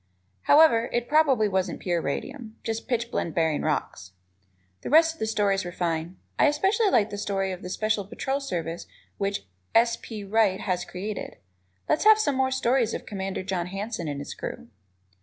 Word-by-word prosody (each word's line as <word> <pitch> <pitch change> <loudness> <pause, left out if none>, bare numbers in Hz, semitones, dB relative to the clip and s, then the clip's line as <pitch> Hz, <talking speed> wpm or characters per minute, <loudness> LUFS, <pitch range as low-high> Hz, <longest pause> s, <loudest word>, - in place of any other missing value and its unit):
However, 285 -7 +6
it 240 0 -1
probably 285 -8 +4
wasn't 190 -2 -1
pure 175 -2 -1
radium, 220 - -5
just 225 0 -3
pitchblende 235 -8 -2
bearing 160 -3 +1
rocks. 95 -11 -3 0.7
The - - -5
rest 320 +2 +6
of 325 - -21
the 220 - -1
stories 200 -3 +1
were 175 - -5
fine. 170 0 -2 0.2
I - - +6
especially 390 +9 +2
like 220 - +2
the 205 - -5
stories 195 -2 -1
of 180 - -8
the 180 - -7
Special 215 +2 0
Patrol 265 +7 -3
Service 170 - -4 0.3
which 195 - -2 0.3
S. 230 0 +4
P. 215 -3 -7
Wright 200 -1 +2
has 180 -2 -1
created. 200 +4 -6 0.5
Let's 310 - +1
have 435 0 +8
some 425 -10 +1
more 260 0 +2
stories 260 -3 +1
of - - -6
Commander 195 -2 -4
John 185 -2 -2
Hanson 195 -1 -4
and 145 -1 -3
his 145 - -6
crew. - - -7
210 Hz, 175 wpm, -26 LUFS, 180-245 Hz, 0.7 s, have